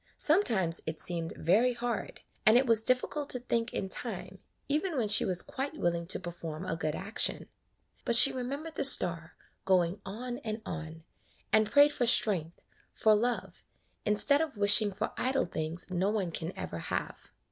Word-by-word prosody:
Sometimes 220 - +2
it 160 0 -4
seemed 170 -2 -4
very 220 +10 +2
hard, 240 -2 -5 0.2
and 215 +2 +5
it 260 - +2
was 230 -3 +5
difficult 255 +5 0
to - - 0
think 235 -1 -2
in 190 - -4
time, - - -5 0.3
even 310 +3 -2
when 230 -4 -1
she 210 - +5
was 180 -2 +1
quite 280 +4 -6
willing 170 - -2
to - - -1
perform 170 -1 -8
a 165 - -3
good 155 -2 -3
action; 200 +4 -1 0.6
but 235 - +1
she 240 +3 +9
remembered 280 +6 -6
the - - -3
star 175 -11 +6 0.3
going 185 -1 0
on 240 +5 -7
and 220 -4 -6
on, 160 -1 -8 0.5
and 215 -1 +3
prayed 290 0 +4
for 245 - -1
strength, 180 -8 +1 0.3
for 220 - +2
love, 235 +3 -2 0.4
instead 280 +8 +2
of 305 -8 -4
wishing 205 +1 +4
for 210 +3 -4
idle 265 +2 -1
things 165 0 -5
no 185 +2 -1
one 200 -5 -2
can 165 +1 -5
ever - - -6
have. - - -6
215 Hz, 170 wpm, -29 LUFS, 175-250 Hz, 0.6 s, she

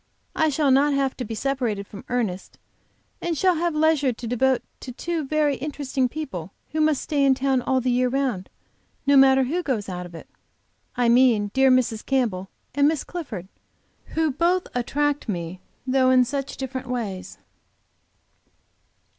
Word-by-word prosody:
I 315 - +3
shall 290 -1 +2
not 280 +2 +4
have 275 -1 0
to 255 - -3
be 225 -1 -5
separated 240 -6 -1
from 200 0 -11
Ernest, 215 -7 -2 0.6
and 340 -2 -2
shall 370 +3 +3
have 340 -1 0
leisure 305 -3 +3
to 235 +1 -8
devote 255 +2 +1 0.2
to 255 - -7
two 330 +5 -3
very 295 -2 +1
interesting 275 -2 -2
people 240 - -6 0.2
who 310 +1 0
must 305 -3 +2
stay 290 -2 0
in 270 -1 +5
town 265 -1 +1
all 260 +1 +1
the 250 0 0
year 250 +1 +2
round, 250 -8 -1 0.6
no 280 0 +4
matter 270 0 +6
who 320 +8 -1
goes 240 - -2
out 180 -1 -5
of 170 - -13
it. 165 - -10 0.7
I 245 -1 +2
mean 235 -4 +4
dear 265 0 +4
Mrs. 250 -4 +2
Campbell 220 -9 -1 0.2
and 285 +1 +4
Miss 310 -2 0
Clifford, 240 - -6 0.7
who 320 -1 +2
both 345 +6 +1
attract 290 +3 -1
me, 175 -1 -4 0.3
though 260 0 +3
in 255 -1 +5
such 275 +1 -4
different 260 -1 -5
ways. 220 -7 -4
265 Hz, 165 wpm, -24 LUFS, 235-290 Hz, 0.7 s, matter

